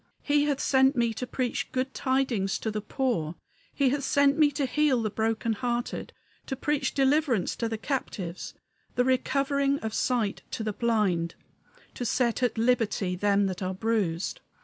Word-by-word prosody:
He 290 Hz, 0 st, +3 dB
hath 285 Hz, -2 st, 0 dB
sent 265 Hz, +1 st, +4 dB
me 235 Hz, -2 st, +1 dB
to 250 Hz, +3 st, -5 dB
preach 255 Hz, +2 st, -2 dB
good 260 Hz, +1 st, -2 dB
tidings 260 Hz, -7 st, 0 dB
to 220 Hz, -, -3 dB
the 210 Hz, 0 st, -3 dB
poor; 215 Hz, -, -1 dB, 0.4 s
He 275 Hz, -2 st, +2 dB
hath 280 Hz, +2 st, -1 dB
sent 280 Hz, +1 st, +3 dB
me 305 Hz, -1 st, +5 dB
to 275 Hz, 0 st, 0 dB
heal 265 Hz, -3 st, +2 dB
the 215 Hz, -, -1 dB
broken 225 Hz, +1 st, 0 dB
hearted, 240 Hz, +2 st, -3 dB, 0.4 s
To 265 Hz, -, -2 dB
preach 295 Hz, +2 st, -1 dB
deliverance 270 Hz, -, +2 dB
to 230 Hz, -, -1 dB
the 225 Hz, -, -2 dB
captives, 205 Hz, -, -4 dB, 0.4 s
The 245 Hz, -, +2 dB
recovering 275 Hz, +2 st, +1 dB
of 220 Hz, -1 st, -3 dB
sight 235 Hz, -6 st, 0 dB
to 225 Hz, -, -4 dB
the 215 Hz, -1 st, -2 dB
blind, 200 Hz, -8 st, +1 dB, 0.6 s
To -, -, -5 dB
set 240 Hz, 0 st, +1 dB
at 245 Hz, -2 st, +1 dB
liberty 225 Hz, -5 st, +1 dB
them 200 Hz, +1 st, +2 dB
that 185 Hz, -1 st, -3 dB
are 185 Hz, 0 st, -2 dB
bruised!" 210 Hz, -, -1 dB
240 Hz, 170 wpm, -27 LUFS, 215-270 Hz, 0.6 s, me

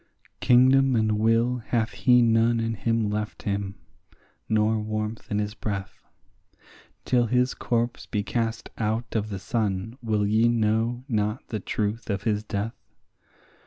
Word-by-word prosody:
Kingdom 130 Hz, +1 st, +5 dB
and 110 Hz, -2 st, +1 dB
will 115 Hz, +3 st, +2 dB
hath 115 Hz, 0 st, -1 dB
he 125 Hz, -1 st, +4 dB
none 115 Hz, 0 st, +3 dB
in 115 Hz, 0 st, -1 dB
him 115 Hz, +1 st, 0 dB
left 105 Hz, 0 st, -4 dB
him, 100 Hz, -1 st, -2 dB, 0.7 s
nor 110 Hz, 0 st, +2 dB
warmth 110 Hz, +1 st, -4 dB
in 105 Hz, -, -1 dB
his 105 Hz, 0 st, -2 dB
breath; 100 Hz, -3 st, -5 dB, 1.0 s
Till 120 Hz, -2 st, +2 dB
his 125 Hz, +2 st, +2 dB
corpse 120 Hz, 0 st, -2 dB
be 105 Hz, -1 st, -1 dB
cast 115 Hz, +1 st, -2 dB
out 110 Hz, +2 st, -2 dB
of 110 Hz, -1 st, 0 dB
the 100 Hz, -, -4 dB
sun 105 Hz, +1 st, -2 dB
will 110 Hz, -3 st, 0 dB
ye 110 Hz, +3 st, +3 dB
know 115 Hz, +2 st, +1 dB
not 105 Hz, -1 st, -2 dB
the 110 Hz, -, -3 dB
truth 105 Hz, +3 st, -3 dB
of 100 Hz, -1 st, -2 dB
his 105 Hz, -1 st, 0 dB
death? 105 Hz, +2 st, -3 dB
110 Hz, 145 wpm, -25 LUFS, 105-120 Hz, 1.0 s, Kingdom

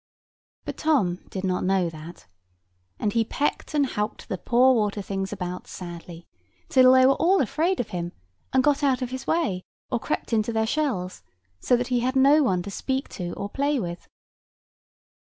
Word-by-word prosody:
But -, -, -5 dB
Tom 230 Hz, -, +1 dB
did 190 Hz, -, -5 dB
not 185 Hz, -1 st, 0 dB
know 185 Hz, -1 st, +2 dB
that; 165 Hz, -, -10 dB, 0.7 s
and 205 Hz, -, -1 dB
he 230 Hz, -, +3 dB
pecked 290 Hz, +6 st, -2 dB
and 290 Hz, -1 st, +3 dB
howked 210 Hz, -5 st, -3 dB
the 190 Hz, -, -2 dB
poor 250 Hz, +6 st, +4 dB
water 210 Hz, -3 st, 0 dB
things 195 Hz, -1 st, -3 dB
about 180 Hz, -3 st, -5 dB
sadly, 170 Hz, -1 st, -9 dB, 0.4 s
till 255 Hz, 0 st, +6 dB
they 260 Hz, 0 st, +6 dB
were 270 Hz, -, +6 dB
all 365 Hz, +7 st, +3 dB
afraid 320 Hz, -, 0 dB
of 240 Hz, -, -2 dB
him, 175 Hz, -1 st, -4 dB, 0.4 s
and 260 Hz, 0 st, +3 dB
got 290 Hz, 0 st, +2 dB
out 270 Hz, -3 st, +2 dB
of 250 Hz, -, -4 dB
his 260 Hz, 0 st, -6 dB
way, 305 Hz, -, 0 dB, 0.3 s
or -, -, +1 dB
crept 230 Hz, -, -3 dB
into 220 Hz, +1 st, +1 dB
their 220 Hz, -1 st, +1 dB
shells; 220 Hz, -9 st, -2 dB, 0.4 s
so 245 Hz, -, +3 dB
he 245 Hz, 0 st, 0 dB
had 255 Hz, +2 st, -1 dB
no 280 Hz, +3 st, +6 dB
one 185 Hz, -10 st, +1 dB
to 200 Hz, -, -7 dB
speak 265 Hz, +6 st, -2 dB
to 175 Hz, -3 st, -5 dB
or 200 Hz, -, -4 dB
play 280 Hz, +5 st, 0 dB
with. 175 Hz, -4 st, -6 dB
230 Hz, 180 wpm, -25 LUFS, 185-265 Hz, 0.7 s, till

